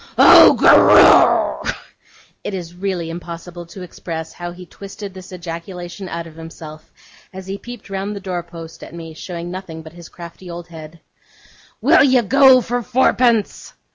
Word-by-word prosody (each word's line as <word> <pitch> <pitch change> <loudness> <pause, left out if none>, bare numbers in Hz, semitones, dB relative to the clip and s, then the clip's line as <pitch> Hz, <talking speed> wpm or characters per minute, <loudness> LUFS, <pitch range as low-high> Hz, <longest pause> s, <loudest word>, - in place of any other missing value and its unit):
'Oh, - - +8
go - - +5
roo!' - - -1 0.7
(it 200 - -5
is 175 -2 -7
really 180 -3 -4
impossible 170 0 -9
to 185 +2 -11
express 160 -2 -8
how 175 0 -7
he 180 +1 -12
twisted 200 +2 -10
this 185 0 -12
ejaculation 175 +1 -8
out 170 0 -6
of 160 -2 -14
himself, 160 -1 -12 0.4
as 190 0 -10
he 195 +1 -6
peeped 240 -2 -11
round 195 +1 -5
the - - -6
door 185 -2 -4
post 165 -1 -12
at - - -11
me, 165 -1 -9
showing 170 +1 -8
nothing 180 -4 -8
but 160 0 -13
his 170 -1 -13
crafty 170 +1 -12
old 170 0 -9
head); 160 0 -12 0.8
'will - - +5
you 255 -3 +3
go 265 +2 +5
for 245 +1 -3
fourpence? 240 -2 0
175 Hz, 165 wpm, -18 LUFS, 170-195 Hz, 0.8 s, Oh